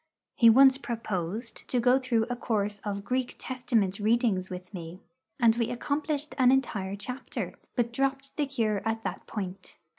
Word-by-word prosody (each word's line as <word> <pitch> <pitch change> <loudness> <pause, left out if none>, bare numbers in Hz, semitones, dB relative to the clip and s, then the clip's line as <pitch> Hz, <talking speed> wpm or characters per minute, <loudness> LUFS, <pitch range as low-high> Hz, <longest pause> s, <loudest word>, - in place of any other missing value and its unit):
He 230 - +7
once 265 +3 +7
proposed 220 -3 -4
to 250 - +2
go 250 +2 +4
through 240 -4 +1
a 245 - -2
course 210 -4 -1
of 200 -1 -3
Greek 255 +3 -1
Testament 225 -7 0
readings 215 -4 +2
with 180 +2 -8
me, 170 0 -7 0.4
and 230 -3 +5
we 235 -1 0
accomplished 290 +3 -2
an 255 -1 +6
entire 205 -8 0
chapter, 250 +6 -5 0.2
but 235 -2 0
dropped 275 +1 -1
the 295 -2 0
cure 220 -7 0
at 225 0 -2
that - - -5
point. 195 -3 -6
230 Hz, 160 wpm, -28 LUFS, 205-260 Hz, 0.4 s, He